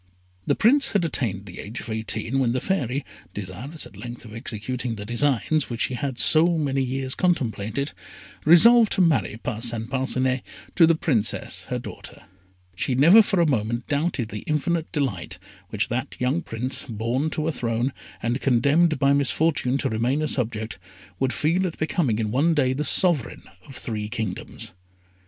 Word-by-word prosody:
The - - +3
Prince 270 +5 +3
had 195 -5 +2
attained 105 - -2
the 90 -3 -10
age 110 +4 -6
of - - -9
eighteen, 110 +3 -2
when 120 -3 +1
the 130 - 0
Fairy, 140 -6 -1 0.3
desirous 105 - -6
at - - -14
length 120 0 -8
of 110 - -11
executing 115 +2 -4
the 105 -1 -7
designs 135 +5 0
which 120 -1 -4
she - - 0
had 130 0 -3
so 165 +4 +4
many 140 -3 0
years 130 0 -2
contemplated, 135 - -1 0.5
resolved 225 +8 +7
to - - +2
marry 130 - +2
Parcin 115 -1 -1
Parcinet 130 0 0 0.3
to 165 -3 +6
the 165 - +4
Princess, 125 -10 -1
her - - -3
daughter. - - -9 0.5
She 125 +7 -1
never 170 - +8
for 200 -3 0
a 170 - +4
moment 120 -4 -1
doubted 145 -6 -1
the 105 - -6
infinite 160 +2 -1
delight 110 - -2 0.3
which 110 -1 -1
that 130 +4 -3
young 130 +7 0
Prince, 125 -2 -3
born 120 +7 -1
to 155 0 -2
a - - +1
throne, 120 0 -1 0.3
and 120 +3 -1
condemned 145 +6 +3
by 140 0 +3
misfortune 140 -1 +1
to - - -1
remain 120 +7 0
a - - 0
subject, 115 -5 -2 0.4
would 130 - +1
feel 175 +7 +1
at 165 - -7
becoming 155 - 0
in 110 -2 -2
one 155 +7 +2
day 130 -3 +2
the 145 +3 -2
sovereign 165 - +2 0.2
of 135 - -12
three 105 -4 -4
kingdoms. 110 -4 -5
130 Hz, 170 wpm, -24 LUFS, 115-155 Hz, 0.5 s, never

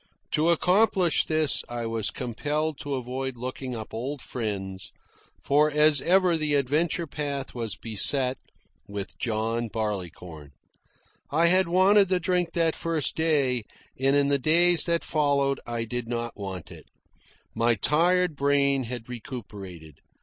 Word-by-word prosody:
To 155 +2 +2
accomplish 180 +1 +3
this 155 -2 +1
I 120 -1 -4
was 115 -2 -1
compelled 150 +5 -3
to 145 -1 -3
avoid 130 0 -4
looking 130 +1 -5
up 110 -2 -8
old 135 +6 -4
friends, 95 -6 -5 0.5
for 150 +2 +3
as 150 -1 +4
ever 180 -1 +3
the 155 -2 0
adventure 150 +5 +1
path 140 -3 -4
was 115 -4 -4
beset 125 +4 0 0.5
with 100 -1 -6
John 115 +1 -1
Barleycorn. 90 -9 -5 0.8
I 160 +4 +2
had 185 +1 +4
wanted 190 +3 +4
the 185 -1 +2
drink 175 -1 0
that 165 -2 +1
first 165 -3 -1
day, 140 -7 +1 0.4
and 135 +1 +3
in 140 0 +3
the 140 0 +2
days 170 +4 +4
that 170 -1 +1
followed 140 -3 +1
I 120 -1 -2
did 120 +1 -4
not 120 0 -4
want 95 -4 -7
it. - - -12 0.7
My 115 +1 +2
tired 170 - +2
brain 140 -1 +2
had 120 -1 -6
recuperated. 100 - -9
140 Hz, 140 wpm, -26 LUFS, 115-160 Hz, 0.8 s, as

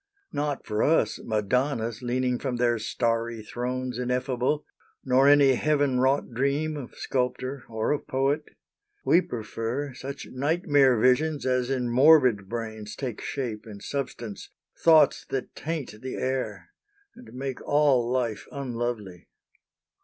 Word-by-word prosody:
Not 145 -1 -2
for 105 0 -1
us 160 - +2
Madonnas 115 +2 -1
leaning 125 0 0
from 130 -3 -2
their 120 -1 +1
starry 115 0 -1
thrones 125 +2 -3
Ineffable, 125 +3 -1 0.4
nor 130 +1 +4
any 140 -2 +6
heaven 145 -1 +1
wrought 135 +1 +2
dream 140 +5 0
Of 140 -4 -8
sculptor 130 +1 -2
or 110 -1 -1
of 150 - -2
poet; 135 +3 +1 0.6
we 175 - +5
prefer 115 - -4
Such 135 +2 -7
nightmare 145 -2 +3
visions 140 +6 +2
as 125 -1 +1
in 130 -2 0
morbid 125 -6 +5
brains 110 -2 -5
Take 125 -6 -5
shape 115 -5 -4
and 105 -2 -9
substance, 120 -6 -5 0.3
thoughts 160 -3 +5
that 135 - -3
taint 150 -9 -5
the 130 - -5
air 130 0 -3 0.4
And 250 - -14
make 135 0 -4
all 140 -5 +3
life 120 -5 -1
unlovely. 120 -9 -4
130 Hz, 130 wpm, -26 LUFS, 120-140 Hz, 0.6 s, any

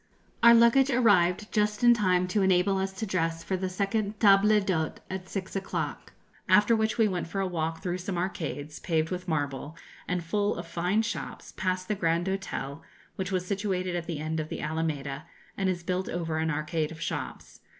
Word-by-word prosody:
] - - -35
Our 235 0 +9
luggage 235 +4 +5
arrived 210 -6 +3
just 210 +1 0
in 240 0 +8
time 185 -5 +2
to 205 +3 +1
enable 190 +1 +3
us 190 0 -1
to 205 +3 -4
dress 165 -4 -1
for 190 - -1
the 185 0 -2
second 200 +2 -1
table 200 -1 +6
d'hôte 180 -6 -1 0.2
at 185 -1 -5
six 190 -1 -5
o'clock, 195 0 -4 0.4
after 210 +3 +5
which 220 -1 0
we 225 -2 +4
went 180 -4 -2
for 195 +4 -4
a 195 - +1
walk 165 -2 -3
through 180 -1 -2
some 185 0 -4
arcades, 155 -5 -4
paved 160 -1 0
with 180 0 -4
marble, 145 -1 -2 0.3
and 180 -1 -1
full 205 +5 0
of 170 - -6
fine 180 +6 0
shops, 230 - -5
past 185 0 -1
the 215 - 0
Grand 170 -2 0
Hotel, 170 -7 -4 0.3
which 190 0 -3
was 185 -1 -1
situated 185 -2 -1
at 170 -1 -3
the 165 -3 -3
end 155 +2 -2
of 155 0 -4
the - - -5
Alameda, 150 -2 -3 0.3
and 195 -1 0
is 175 -2 -2
built 185 +1 -2
over 165 -2 -2
an 160 0 0
arcade 155 +1 -1
of 165 - -9
shops. - - -5
185 Hz, 200 wpm, -28 LUFS, 165-200 Hz, 0.4 s, Our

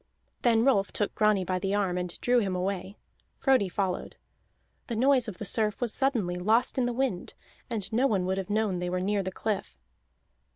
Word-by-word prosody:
Then 230 -1 +3
Rolf 200 -8 +3
took 205 - -1
Grani 210 -3 +2
by 185 0 -1
the 195 +2 -1
arm 195 -3 0
and 180 -1 -4
drew 245 0 +3
him 195 -5 -1
away. 190 +1 -3 0.4
Frodi 260 -8 +3
followed. 185 -1 -2 0.7
The 235 - -3
noise 255 +1 +3
of 205 -5 -6
the 210 - -6
surf 210 +1 +1
was 240 -3 -1
suddenly 230 -10 0
lost 220 +8 +2
in 245 - +2
the - - 0
wind, 240 -7 -2 0.3
and 220 -4 -3
no 255 +4 +3
one 195 -7 0
would 190 +1 -1
have 190 - -5
known 205 -3 0
they 180 0 -2
were 180 +1 -1
near 200 +2 0
the 190 0 -4
cliff. 210 +1 -3
205 Hz, 200 wpm, -28 LUFS, 185-235 Hz, 0.7 s, Then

